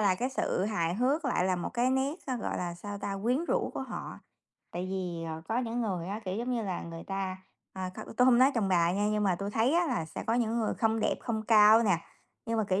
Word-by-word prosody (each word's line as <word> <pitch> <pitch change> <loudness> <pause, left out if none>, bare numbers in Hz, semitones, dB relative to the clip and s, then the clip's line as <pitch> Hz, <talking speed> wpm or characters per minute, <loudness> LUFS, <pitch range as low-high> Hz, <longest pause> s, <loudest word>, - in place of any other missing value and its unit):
là 200 -3 +4
cái 250 +7 -1
sự 200 -7 0
hài 175 -6 0
hước 270 - +1
lại 250 -9 +1
là 185 -1 +1
một 175 - -3
cái 245 +1 +2
nét, 265 +3 +1
gọi 250 -4 -2
là, 175 -1 -3
sao 205 +3 -7
ta, 200 -1 -3
quyến 250 +8 +1
rũ - - 0
của - - -3
họ. - - -6 0.5
Tại 180 +1 -3
vì, 180 -3 -3
ờ, 160 0 -6
có 225 - +1
những 240 -1 -2
người 185 -7 -2
á, 210 +3 -4
kiểu, 185 0 -3
giống 240 +3 -2
như 240 -2 0
là, 185 -3 -3
người 165 0 -7
ta 195 -1 -3 0.4
à, 185 -1 -4
kh - - -12 0.2
tôi 250 +2 +5
không 245 -2 +6
nói 260 +2 +6
chồng 210 -4 +1
bà 175 -1 +3
nha, 205 +2 +1
nhưng 210 0 +1
mà 190 -3 +3
tui 200 +2 -4
thấy 230 +7 +2
á 345 0 +3
là 245 - -1
sẽ 160 - -7
có 225 - +2
những 235 -1 +1
người 220 - 0
không 225 0 +1
đẹp, - - +2
không 220 -3 -2
cao 220 0 +7
nè, 190 -7 +3 0.5
nhưng 230 0 0
mà, 220 - +2
kiểu, 185 +1 +2
210 Hz, 265 wpm, -30 LUFS, 185-240 Hz, 0.5 s, cao